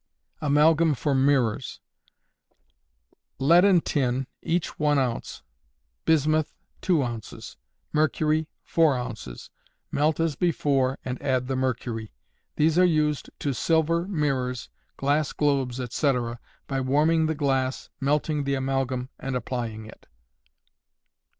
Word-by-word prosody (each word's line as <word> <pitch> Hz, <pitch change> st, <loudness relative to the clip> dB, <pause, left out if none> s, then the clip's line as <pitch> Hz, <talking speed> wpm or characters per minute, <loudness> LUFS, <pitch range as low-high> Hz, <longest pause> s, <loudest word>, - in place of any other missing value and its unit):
Amalgam 155 Hz, +2 st, +4 dB
for 145 Hz, +3 st, -1 dB
Mirrors. 130 Hz, -3 st, +1 dB, 1.6 s
Lead 165 Hz, +7 st, +5 dB
and 190 Hz, -4 st, +4 dB
tin, 130 Hz, -2 st, 0 dB, 0.2 s
each 170 Hz, 0 st, -2 dB
1 150 Hz, -1 st, +3 dB
oz; 125 Hz, -4 st, -2 dB, 0.6 s
bismuth, 155 Hz, 0 st, +2 dB, 0.3 s
2 170 Hz, -7 st, +2 dB
oz; 120 Hz, -3 st, -7 dB, 0.4 s
mercury, 155 Hz, 0 st, +1 dB, 0.2 s
4 160 Hz, -5 st, +3 dB
oz.; 115 Hz, -, -7 dB, 0.4 s
melt 150 Hz, +2 st, +1 dB
as 165 Hz, -3 st, +1 dB
before, 140 Hz, -5 st, +1 dB
and 125 Hz, -1 st, -4 dB
add 130 Hz, -3 st, 0 dB
the 135 Hz, +1 st, -2 dB
mercury. 120 Hz, -4 st, -3 dB, 0.4 s
These 160 Hz, +3 st, +3 dB
are -, -, +6 dB
used 155 Hz, -4 st, +1 dB
to 140 Hz, -, -2 dB
silver 165 Hz, +5 st, +1 dB
mirrors, 135 Hz, -, -1 dB, 0.3 s
glass 145 Hz, +2 st, +1 dB
globes, 135 Hz, -4 st, 0 dB
etc., 125 Hz, -1 st, -1 dB, 0.3 s
by 135 Hz, -1 st, -2 dB
warming 155 Hz, +5 st, +2 dB
the 160 Hz, -, -1 dB
glass, 135 Hz, -3 st, -1 dB
melting 150 Hz, +2 st, 0 dB
the 140 Hz, 0 st, 0 dB
amalgam, 130 Hz, -1 st, -1 dB
and 135 Hz, -1 st, -4 dB
applying 115 Hz, -3 st, -4 dB
it. 110 Hz, -, -15 dB
140 Hz, 115 wpm, -25 LUFS, 130-155 Hz, 1.6 s, are